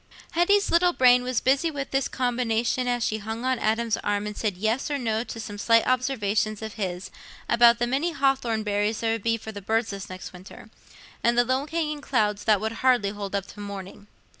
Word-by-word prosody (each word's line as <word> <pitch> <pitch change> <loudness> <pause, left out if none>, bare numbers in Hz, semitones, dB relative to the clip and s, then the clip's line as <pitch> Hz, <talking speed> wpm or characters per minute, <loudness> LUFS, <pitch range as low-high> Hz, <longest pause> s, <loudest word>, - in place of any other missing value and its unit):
Hetty's 400 +4 +2
little 350 +1 +4
brain 250 -3 +5
was 250 -1 -1
busy 275 +5 +2
with 280 -3 -5
this 270 -1 +1
combination 245 0 0
as 245 -1 0
she 215 -1 -1
hung 220 +3 -5
on 260 -2 +1
Adam's 225 +1 0
arm 205 0 -1
and 210 0 -5
said 205 -5 -2
"yes" 220 +8 -1
or 290 - -1
"no" 225 -3 -1
to 225 - -7
some 205 -2 -7
slight 230 +2 +4
observations 220 -4 0
of 220 -1 -6
his 185 -3 -4 0.4
about 235 0 +6
the 240 - 0
many 275 +8 0
hawthorn 265 -7 0
berries 210 +1 -1
there 225 -1 +1
would 225 -1 -2
be 230 +2 +1
for 220 0 -8
the 205 -1 -8
birds 225 +3 0
this 195 -1 -7
next 185 +1 -8
winter, 180 +1 -13 0.5
and 235 0 +2
the 245 - +4
low 260 +3 0
hanging 305 -2 -2
clouds 210 -7 0
that 215 -2 +4
would 220 +2 -2
hardly 245 -6 +3
hold 200 -1 -5
up 200 -1 -2
till 205 - -11
morning. 200 0 -8
230 Hz, 215 wpm, -25 LUFS, 210-255 Hz, 0.5 s, about